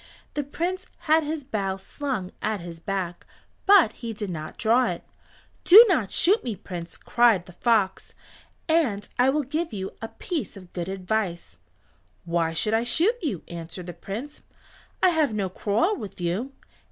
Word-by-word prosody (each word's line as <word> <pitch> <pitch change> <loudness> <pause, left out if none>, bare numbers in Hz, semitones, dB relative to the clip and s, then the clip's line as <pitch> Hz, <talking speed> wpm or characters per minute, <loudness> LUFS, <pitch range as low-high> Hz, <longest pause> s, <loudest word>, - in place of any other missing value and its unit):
The 295 - -1
Prince 355 +6 -3
had 315 +1 +3
his 300 0 -3
bow 200 -7 -2
slung 205 -2 -4
at 215 -1 -1
his 170 -1 -8
back, 185 -1 -3 0.4
but 390 - +7
he 230 -2 -6
did 205 -3 -5
not 155 -2 -6
draw 235 +3 +3
it. - - -4 0.6
"Do 430 +7 +10
not 255 - +1
shoot 405 +6 +3
me, 230 -4 -3
Prince," 175 -3 -8
cried 230 -7 +3
the 180 - -13
fox, 205 -3 +1 0.5
"and 270 -12 +1
I 250 +2 +5
will 295 +2 +1
give 310 +5 -2
you 190 -2 -4
a 225 - -3
piece 290 - -5
of 185 -2 -14
good 175 0 -4
advice." 185 - -3 0.7
"Why 170 -1 0
should 170 +7 0
I 225 +1 +3
shoot 345 - +2
you?" 255 - -3
answered 170 +1 -7
the 175 - -7
Prince. 240 - -7 0.6
"I 370 - +7
have 310 -9 +1
no 195 -3 -1
quarrel 220 - +1
with 205 - -8
you. 180 +10 -2
215 Hz, 165 wpm, -25 LUFS, 185-290 Hz, 0.7 s, Do